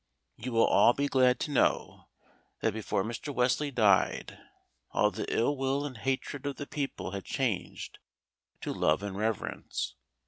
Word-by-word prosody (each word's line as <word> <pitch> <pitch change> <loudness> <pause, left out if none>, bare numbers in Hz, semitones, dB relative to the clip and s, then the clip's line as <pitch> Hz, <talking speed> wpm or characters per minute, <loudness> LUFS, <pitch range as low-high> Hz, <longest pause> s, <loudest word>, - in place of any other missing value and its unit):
You 125 +3 -5
will 115 - +5
all 120 - +6
be 140 +2 0
glad 130 -2 +4
to 150 - -2
know 140 - +1 0.5
that 110 - +1
before 105 -3 -1
Mr. 115 +7 -4
Wesley 130 +3 +1
died, 110 -7 +2 0.5
all - - +2
the - - -4
ill 130 +6 +2
will 135 +1 0
and 140 -3 -5
hatred 135 +3 -2
of 140 - -2
the 145 - -6
people 140 -10 -4
had 100 0 -5
changed 120 -9 -3 0.6
to - - -3
love 80 +6 +2
and 100 -2 -4
reverence. 110 0 -2
125 Hz, 160 wpm, -30 LUFS, 110-140 Hz, 0.6 s, all